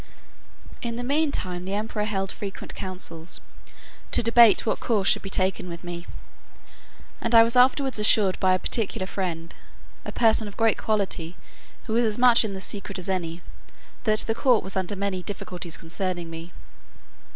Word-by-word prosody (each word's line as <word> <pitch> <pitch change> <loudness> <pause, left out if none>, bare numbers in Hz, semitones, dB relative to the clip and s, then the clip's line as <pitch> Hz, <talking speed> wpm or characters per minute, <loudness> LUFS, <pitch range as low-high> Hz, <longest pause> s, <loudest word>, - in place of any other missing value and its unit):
In 235 -1 -4
the 245 - -4
mean 290 +4 +1
time 180 -6 -4
the 190 +2 -3
emperor 210 0 -2
held 195 -2 -2
frequent 200 -3 -7
councils, 180 -3 -4 0.7
to - - +4
debate 230 -1 +6
what 220 - 0
course 210 -5 0
should - - +4
be 195 - -5
taken 185 -1 -1
with 170 0 -8
me; 175 0 -7 1.1
and 235 0 0
I 225 - +9
was 230 +2 +1
afterwards 260 0 +3
assured 210 -2 +4
by 185 -1 +3
a - - +1
particular 195 -1 -1
friend, 170 -4 -4 0.5
a - - -6
person 220 -2 +2
of 205 - -11
great 225 -1 +2
quality, 190 -5 -2 0.5
who 220 - -3
was 235 +1 +3
as 215 -2 -1
much 245 -1 +6
in 205 -3 -4
the - - -5
secret 200 0 -4
as 185 +1 -4
any, 170 -2 -3 0.6
that 215 -1 +3
the 225 - -1
court 245 -1 +2
was 190 - -4
under 190 +1 -2
many 195 -1 -2
difficulties 180 -3 -6
concerning 175 0 -4
me. 165 +1 -8
200 Hz, 175 wpm, -25 LUFS, 180-225 Hz, 1.1 s, I